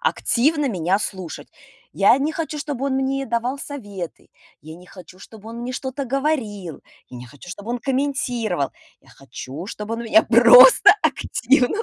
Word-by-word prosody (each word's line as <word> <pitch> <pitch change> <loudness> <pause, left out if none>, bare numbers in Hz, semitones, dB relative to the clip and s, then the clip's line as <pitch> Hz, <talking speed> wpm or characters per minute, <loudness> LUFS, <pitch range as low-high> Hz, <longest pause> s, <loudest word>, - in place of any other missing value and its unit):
активно 300 - 0
меня 185 -3 0
слушать. 190 -5 -6 0.4
Я 200 +5 +4
не 295 +3 -1
хочу, 315 -2 -5
чтобы 285 -2 -4
он 270 - -1
мне 270 +1 -1
давал 240 +4 -2
советы. 205 - -8 0.3
Я 155 +2 -12
не 180 +1 -17
хочу, 185 0 -15
чтобы 220 +2 -13
он 230 +1 -8
мне 250 +1 -5
что-то 265 +2 -5
говорил. 240 - -3 0.3
Я 125 - -11
не 125 - -9
хочу, 145 +7 -15
чтобы 205 +5 -8
он 245 - -2
комментировал. 245 - -2 0.3
Я - - -26
хочу, 135 +5 -10
чтобы 210 +1 -6
он 230 - -6
меня 220 -1 +4
просто 245 - +7
активно 260 - 0
235 Hz, 160 wpm, -21 LUFS, 190-275 Hz, 0.4 s, просто